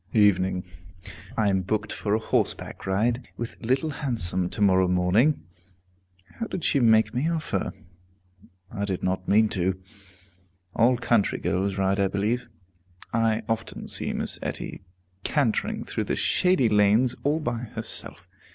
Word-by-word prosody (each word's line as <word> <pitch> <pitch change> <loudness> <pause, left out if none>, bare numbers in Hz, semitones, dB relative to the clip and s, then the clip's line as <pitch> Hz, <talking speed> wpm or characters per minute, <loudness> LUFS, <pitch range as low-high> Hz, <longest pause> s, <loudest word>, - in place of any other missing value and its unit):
Evening. 95 -4 +3 0.7
I 105 -2 +3
am 95 -1 +1
booked 105 +3 -2
for 105 0 -1
a - - +1
horseback 110 - -2
ride 115 +6 0
with 120 0 -7
Little 135 +6 +1
Handsome 95 - 0
to - - -7
morrow 95 -2 +4
morning. 90 - +2 1.0
How 230 - -2
did 180 - -5
she 140 - +2
make 110 -2 +4
me 135 +7 0
offer? 165 -2 -2 1.0
I 100 -2 -2
did 95 -3 -3
not 95 0 -1
mean 110 +2 +5
to. 95 -1 -1 1.0
All 120 +2 +4
country 115 -3 +1
girls 95 +1 -1
ride, 95 +1 +1
I 100 - +3
believe. 105 +6 -1 0.6
I 115 -1 +1
often 115 -1 -3
see - - +1
Miss - - 0
Etty - - -5 0.4
cantering 140 -7 0
through - - -3
the - - -1
shady 180 -9 +2
lanes 105 +4 +4
all 150 +3 +1
by 120 -7 -2 0.2
herself. 115 0 -4
110 Hz, 140 wpm, -26 LUFS, 95-120 Hz, 1.0 s, mean